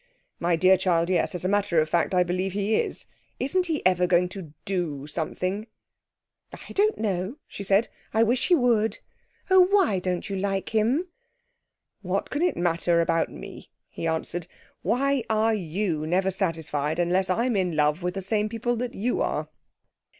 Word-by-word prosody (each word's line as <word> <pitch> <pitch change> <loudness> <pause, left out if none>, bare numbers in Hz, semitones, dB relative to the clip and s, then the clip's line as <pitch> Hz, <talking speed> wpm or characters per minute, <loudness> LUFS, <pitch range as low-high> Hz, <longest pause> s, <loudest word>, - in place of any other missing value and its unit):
'My 170 0 +2
dear 185 +3 +5
child, 175 -1 +1
yes 180 0 +1
as 180 - -4
a - - +3
matter 200 -4 +2
of 155 - +2
fact, 170 +3 +1
I 180 - +5
believe 180 +2 -2
he 205 +2 0
is. - - -1 0.3
Isn't 360 +7 0
he 315 -3 -2
ever 180 -1 +3
going 180 0 +3
to 185 -5 -8
do 170 -8 -2
something?' 185 +7 -3 0.8
'I - - -11
don't 425 +2 +2
know,' 200 +3 -2
she 200 - -7
said. 200 +4 +3 0.2
'I 225 +1 +3
wish 240 +2 +1
he 360 - +5
would. 235 -6 +2 0.5
Oh, 375 - +7
why 365 - +3
don't 180 -1 -2
you 200 - -3
like 195 0 -1
him?' 235 +11 +1 0.9
'What - - -2
can 290 - -1
it 355 0 +1
matter 170 0 +2
about 165 -1 +1
me?' - - -10 0.2
he 165 - -4
answered. 165 +1 -2 0.3
'Why 275 +1 +1
are 220 +1 +2
you 170 -4 -2
never 190 +3 +1
satisfied 160 -5 -1
unless 180 +2 +1
I'm 235 +5 +1
in 180 -4 0
love 150 +3 +2
with 180 +1 -2
the 195 - -4
same 210 +2 0
people 235 +2 -1
that 245 +1 -4
you 240 +5 -1
are?' - - -1
190 Hz, 175 wpm, -26 LUFS, 175-225 Hz, 0.9 s, Oh